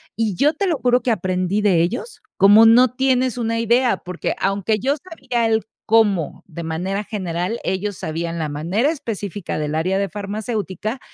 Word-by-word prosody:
Y 215 -3 -1
yo 295 - +3
te 385 +5 -1
lo 330 - +1
juro 250 -1 +2
que 240 0 0
aprendí 185 0 0
de 185 -5 +3
ellos, 245 - -3 0.2
como 205 +3 +7
no 240 +2 +6
tienes 255 -1 +1
una 230 -1 -1
idea, 235 +2 +2
porque, 180 -1 -4
aunque 200 +2 0
yo 275 +6 +1
sabía 265 -9 -2
el 220 -1 +1 0.2
cómo, 210 -8 +2
de 170 -2 -8
manera 180 +5 -3
general, 190 0 -3
ellos 195 +1 -2
sabían 165 +1 -4
la 160 - -2
manera 175 - 0
específica 205 - -5
del 150 0 -2
área 180 +5 0
de 200 0 0
farmacéutica, 210 +2 -4
210 Hz, 170 wpm, -20 LUFS, 185-240 Hz, 0.2 s, como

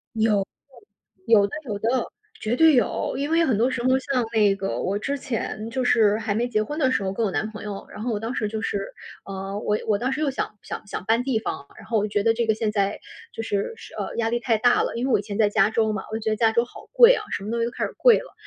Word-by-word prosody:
有， 220 -1 +3 0.7
对， - - -67 0.2
有 200 -1 +5
的， - - -15
有 210 -5 -3
的， 235 +3 0 0.3
绝 220 +3 -1
对 320 +2 +6
有。 245 - +1
因 285 +2 -2
为 330 +1 +3
很 255 - +2
多 235 +4 +3
时 245 -2 -3
候， 255 - +2
像 260 -2 -1
那 210 -3 +4
个 195 0 -3
我 195 +2 -1
之 280 +7 -2
前 225 -3 -4
就 255 +2 -2
是 215 -4 +4
还 215 -2 -2
没 235 +4 0
结 215 -3 0
婚 295 +8 -5
的 260 -4 +3
时 200 - 0
候， 190 0 -2
跟 230 - -1
我 205 - 0
男 215 - -1
朋 215 - -9
友， 205 -2 -6
然 210 - -8
后 240 +2 -2
我 210 - -1
当 225 +3 -4
时 215 - -1
就 220 +1 -4
是， 200 -2 -3 0.3
呃， 195 0 -5
我 210 0 0
我 210 -2 +3
当 255 +4 -1
时 300 - -2
又 300 - +2
想 215 -5 -4
想 - - -7
想 190 - -6
搬 230 +4 +2
地 260 -3 0
方 - - -4
啊， 140 - -15
然 - - -12
后 230 - 0
我 210 - 0
觉 205 -1 0
得 225 - +4
这 230 0 -1
个 220 - +3
现 215 -1 -1
在 200 -1 0 0.3
就 225 - -5
是 205 - -2
是 - - -13
呃， - - -4
压 225 -1 0
力 240 +1 0
太 235 -2 +1
大 245 +3 +4
了。 - - -2
因 235 +2 -1
为 265 - 0
我 - - +4
以 - - -2
前 205 -1 -6
在 215 -2 +4
加 205 -1 +3
州 220 -1 +1
嘛， 195 - -4
我 - - -2
就 - - -6
觉 220 - -1
得 - - +1
加 225 0 +3
州 235 +1 +2
好 - - -14
贵 - - +8
啊， 430 - -4
什 - - -3
么 210 - -4
东 235 - -1
西 230 - +1
都 235 - -3
开 - - -2
始 - - -6
贵 - - +6
了， - - -12
225 Hz, 325 characters per minute, -24 LUFS, 210-245 Hz, 0.7 s, 贵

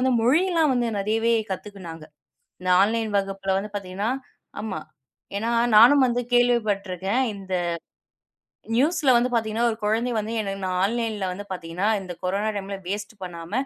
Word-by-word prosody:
வந்து 260 0 +2
மொழிலாம் 320 +2 +3
வந்து 240 -1 +1
நிறையவே 225 +3 +1 0.2
கத்துக்கிநாங்க. 185 -5 -8 0.6
இந்த 185 - -1
ஆன்லைன் 220 0 0
வகுப்புல 195 -1 -2
வந்து 210 +1 -6
பாத்தீங்கன்னா. 200 +3 -3 0.5
ஆமா. 210 -6 -4 0.6
ஏன்னா 225 +3 -1 0.3
நானும் 260 +5 +8
வந்து 245 0 0
கேள்விப்பட்டிருக்கேன். 215 -3 +1
இந்த 190 -1 -5 1.2
நியூஸ்ல 295 +2 +3
வந்து 240 +1 +3
பாத்தீங்கன்னா 225 0 +1
ஒரு 220 - -3
குழந்தை 225 +4 +1
வந்து 215 +1 -2
என்னை 195 -2 -3
ஆன்லைன்ல 220 -2 -1
வந்து 200 +3 -7
பாத்தீங்கன்னா 180 +2 -3
இந்தக் 180 -3 -9
கொரோனா 200 +4 0
டைம் 195 -1 -5 0.2
வேஸ்ட் 205 +2 -4
பண்ணாம, 170 -2 -8
210 Hz, 135 wpm, -24 LUFS, 195-235 Hz, 1.2 s, நானும்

